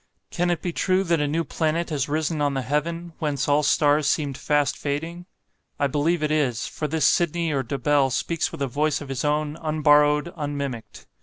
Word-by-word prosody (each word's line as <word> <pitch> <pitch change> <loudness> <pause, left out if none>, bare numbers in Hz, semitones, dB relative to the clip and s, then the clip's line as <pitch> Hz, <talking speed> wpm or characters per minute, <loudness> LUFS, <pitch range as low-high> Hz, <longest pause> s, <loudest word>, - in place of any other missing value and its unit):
Can 175 0 0
it 175 -2 -1
be 175 - -2
true 185 +2 +1
that 170 -3 +1
a 145 - +1
new 160 +3 0
planet 165 +2 -1
has 145 -2 -1
risen 155 +1 -1
on 145 -1 +1
the 135 - -1
heaven, 165 +5 -2
whence 145 -3 -1
all 145 +1 +3
stars 150 0 +3
seemed 145 -4 0
fast 145 0 +1
fading? 165 +5 -4 0.5
I 145 - +2
believe 150 +4 0
it 150 - 0
is; 135 -7 0
for 150 - -4
this 160 0 0
Sydney 170 -1 +2
or 140 -2 0
Dobell 140 +2 +1
speaks 165 +5 -1
with 140 - -4
a - - 0
voice 150 +4 0
of 145 - -9
his 130 -2 -3
own, 150 +1 0
unborrowed, 150 0 +3
unmimicked. 140 -7 -5
150 Hz, 200 wpm, -24 LUFS, 145-165 Hz, 0.5 s, all